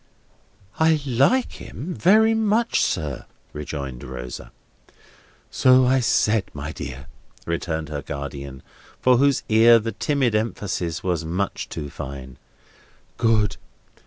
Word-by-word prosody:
"I 160 -1 +4
like 140 - +2
him 175 +7 -7
very 220 +7 +4
much, 225 +1 +1
sir," 75 -6 -2 0.3
rejoined 70 -4 -6
Rosa. 60 -1 -8 1.0
"So 130 0 +5
I 130 +1 +3
said, 110 -3 +2
my 75 +2 -5
dear," 65 -3 -7 0.4
returned 80 -2 -3
her 75 -2 -4
guardian, 70 -1 -7 0.4
for 125 -1 +4
whose 140 +1 +2
ear 115 +2 +6
the 115 0 -2
timid 135 -5 0
emphasis 95 -5 -2
was 90 -3 -1
much 90 +5 -3
too 75 -1 -6
fine. 65 -3 -8 0.8
"Good. 110 -3 +2
100 Hz, 115 wpm, -23 LUFS, -, 1.0 s, ear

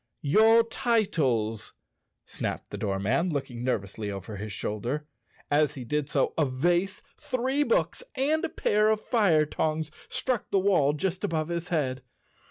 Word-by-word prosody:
"Your 220 +9 +6
titles," 145 - 0 0.5
snapped - - -5
the - - -5
doorman, 105 - 0
looking 135 -6 -4
nerv¬ 125 -5 0
ously 105 +2 -6
over 100 +1 -6
his 105 +1 -6
shoulder. 120 +10 -3 0.5
As 150 0 +3
he 130 - -6
did 150 +3 -1
so, 140 -4 +1
a - - +5
vase, 175 +9 0 0.2
three 265 0 -1
books 475 +13 +1
and 295 +4 +1
a 335 - 0
pair 210 -5 +2
of 220 -1 +2
fire 195 -10 +3
tongs 155 0 -2 0.2
struck 255 -4 -2
the - - +2
wall 185 -7 +3
just 180 +5 -2
above 160 -5 -1
his 170 0 -3
head. 135 -7 -1
155 Hz, 155 wpm, -27 LUFS, 130-210 Hz, 0.5 s, Your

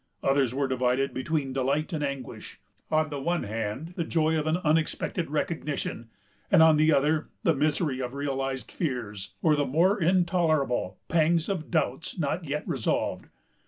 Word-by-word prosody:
Others 135 -3 +2
were 135 +1 0
divided 130 +1 0
between 135 0 -2
delight 140 +6 0
and 150 -2 -1
anguish: 140 -3 -6 0.3
on 155 0 +1
the 140 -1 -4
one 170 +4 0
hand, 110 - -4
the 170 - -1
joy 160 -1 +1
of 155 -1 -1
an 160 +2 +2
unexpected 160 +1 0
recognition; 150 -6 -3 0.4
and, 180 -5 +7
on 160 -1 +6
the 155 +1 +4
other, 150 +2 +2
the 165 - +4
misery 150 -1 0
of 125 +1 -4
realized 135 -2 -3
fears, 115 - -4
or 155 -2 +5
the 145 - +1
more 180 +8 +2
intolerable 170 -6 +1
pangs 165 +1 +2
of 180 -6 -3
doubts 135 +9 -1
not 165 +2 -1
yet 150 +1 -3
resolved. 125 -5 -1
150 Hz, 160 wpm, -27 LUFS, 135-160 Hz, 0.4 s, and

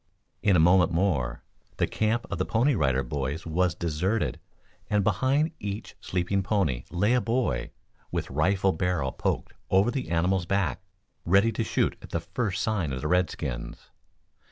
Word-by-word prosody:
In 100 -3 +4
a - - +5
moment 90 +1 +5
more, 80 -9 0 0.3
the - - +2
camp 110 +2 0
of 95 - -3
the - - +2
Pony 120 +6 +2
Rider 65 - +1
Boys 70 +4 -3
was 85 0 +1
deserted, 90 +6 -1 0.5
and 105 -1 +2
behind 130 - +2
each 105 +1 -5
sleeping 95 +2 0
pony 95 - 0
lay 100 +6 +2
a 125 - +3
boy, 115 - 0 0.4
with - - -3
rifle 95 +7 +2
barrel 85 -6 -1
poked - - -2 0.2
over 95 +5 +4
the 130 - -3
animal's 85 +2 +1
back, 100 0 0 0.4
ready 100 +6 +4
to 115 - -1
shoot - - 0
at - - -11
the 85 - -1
first 95 +4 -2
sign 100 -10 0
of 65 - -4
the 75 - -2
redskins. 75 -8 -2
95 Hz, 160 wpm, -27 LUFS, 80-105 Hz, 0.5 s, a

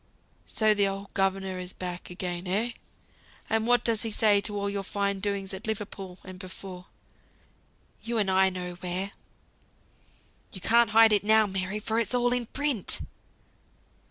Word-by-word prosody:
"So 215 -1 +3
the 205 -1 +2
old 195 0 -6
governor 195 -1 -1
is 180 0 -7
back 180 -1 -6
again, 180 0 -5
eh? 215 +6 0 0.8
And 225 0 +1
what 245 -1 +4
does 225 -2 +2
he 225 - -1
say 210 -1 +4
to 205 0 -3
all 200 0 -1
your 200 0 -2
fine 200 0 -2
doings 200 -1 -2
at 190 +3 -6
Liverpool, 195 -4 -5
and 185 -1 -10
before? 185 -1 -9 1.1
you 235 0 -3
and 200 -3 +2
I 190 0 +5
know 180 -1 -5
where. 185 +2 -3 1.4
You 190 - -7
can't 235 +5 +4
hide 225 0 +6
it 205 - +3
now, 220 +1 +5
Mary, 190 0 -3
for 220 +1 -1
it's 230 +2 0
all 245 0 +2
in 245 -2 -1
print." 275 -7 +2
200 Hz, 160 wpm, -27 LUFS, 190-220 Hz, 1.4 s, hide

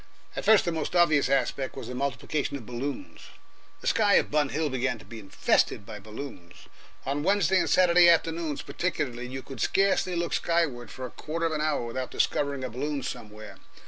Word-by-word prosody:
At - - -4
first 220 -2 +6
the 170 - 0
most 160 +1 -3
obvious 155 -5 +4
aspect 135 0 0
was 135 - -7
the 125 - -6
multiplication 140 +2 -2
of 120 - -11
balloons. 140 - -6 0.5
The - - -12
sky 205 -3 +4
of - - +3
Bun 150 -2 +2
Hill 155 +3 -1
began 130 -2 -1
to 105 - -15
be 110 +3 -9
infested 100 0 +1
by 105 -1 -8
balloons. 100 -5 -10 0.4
On 140 +2 -1
Wednesday 190 +1 +3
and - - 0
Saturday 175 -1 +6
afternoons 165 -2 +1
particularly 130 -9 -3
you 130 +1 -6
could 135 - -8
scarcely 195 -2 +2
look 170 0 -1
skyward 150 -9 0
for 130 +5 -7
a 125 - -8
quarter 165 +2 -4
of 165 - 0
an 155 -1 -1
hour 150 -5 0
without 130 +2 -4
discovering 140 -2 0
a 130 - -3
balloon 140 +3 -3
somewhere. 105 0 -8
140 Hz, 190 wpm, -27 LUFS, 125-165 Hz, 0.5 s, first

